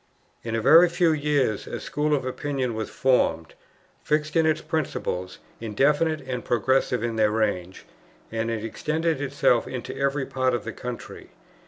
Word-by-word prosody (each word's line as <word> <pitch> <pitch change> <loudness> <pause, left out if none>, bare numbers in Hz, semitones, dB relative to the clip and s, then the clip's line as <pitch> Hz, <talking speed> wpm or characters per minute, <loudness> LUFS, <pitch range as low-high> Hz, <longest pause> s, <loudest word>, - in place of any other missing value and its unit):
In 115 -1 -3
a 115 - 0
very 170 +6 +7
few 170 -1 +2
years 145 -8 0
a - - -5
school 150 0 0
of 135 - -3
opinion 130 -1 -2
was 110 -1 -4
formed, 125 - +1 0.5
fixed 150 0 0
in 160 -1 +4
its 155 0 +2
principles, 95 - -3 0.2
indefinite 145 +8 +1
and 130 -2 -5
progressive 125 0 +1
in 115 -1 -2
their 110 -1 +4
range; 105 -4 -2 0.5
and 115 0 -2
it 115 -1 -3
extended 160 +5 -1
itself 135 -4 +2
into 125 -2 -6
every 140 0 0
part 130 -1 0
of 115 - -4
the 115 - -6
country. 125 -1 -8
130 Hz, 160 wpm, -25 LUFS, 115-150 Hz, 0.5 s, very